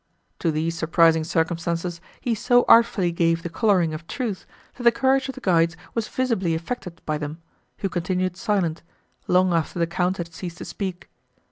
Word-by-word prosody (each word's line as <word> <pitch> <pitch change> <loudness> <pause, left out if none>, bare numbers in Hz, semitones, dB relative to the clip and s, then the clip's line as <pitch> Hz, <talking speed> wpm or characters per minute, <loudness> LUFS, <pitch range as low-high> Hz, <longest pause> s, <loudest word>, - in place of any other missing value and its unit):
To 170 - +1
these 160 +2 -1
surprising 160 0 +3
circumstances 165 +1 -1 0.2
he 240 - -1
so 245 +3 +3
artfully 215 -6 +5
gave 165 -1 +1
the 170 - -5
colouring 180 -5 +2
of 160 +2 -7
truth, 230 -8 -4 0.3
that - - -11
the 235 0 +6
courage 265 +2 +2
of 265 - -5
the 265 - -10
guides 165 -4 +2 0.2
was 230 -2 -1
visibly 225 -10 0
affected 170 -1 -6
by 155 -1 -1
them, 150 +1 -5 0.4
who 195 - -1
continued 180 0 -1
silent, 185 -4 -1 0.5
long 180 0 +3
after 165 0 -1
the 170 - +2
Count 180 +2 -1
had 170 -1 -6
ceased 175 0 -7
to - - -7
speak. 190 -3 -5
175 Hz, 175 wpm, -24 LUFS, 165-200 Hz, 0.5 s, the